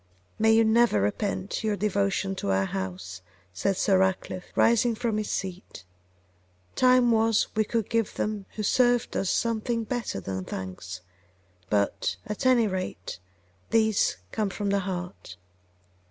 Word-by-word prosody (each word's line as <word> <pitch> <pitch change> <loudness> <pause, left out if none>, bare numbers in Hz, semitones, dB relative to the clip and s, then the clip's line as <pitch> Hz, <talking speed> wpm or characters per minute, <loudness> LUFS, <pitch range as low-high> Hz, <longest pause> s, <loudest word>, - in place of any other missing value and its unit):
'May 220 0 +5
you 225 0 +5
never 225 - +4
repent 185 - -2
your 215 -1 +1
devotion 200 -1 0
to 100 - -3
our 95 0 +2
house!' 95 -1 -5 0.3
said 185 - 0
Sir 195 -2 +3
Ratcliffe, 190 -1 -1
rising 235 0 +3
from 225 -2 -1
his 210 - -3
seat. 185 - -5 0.9
'Time 255 -1 +4
was 225 -1 +3
we 215 - +3
could 225 0 -1
give 230 -3 -1
them 210 -2 -3
who 215 - -3
served 245 +2 +2
us 195 - 0
something 230 0 0
better 235 - -3
than 95 0 -4
thanks; 90 0 -6 0.7
but, 100 -2 0
at 210 +5 -2
any 245 -3 +5
rate, 185 - -4 0.5
these 220 -2 +2
come 215 -2 -1
from 200 +1 -2
the 200 - +2
heart. 180 - -6
200 Hz, 140 wpm, -27 LUFS, 175-225 Hz, 0.9 s, May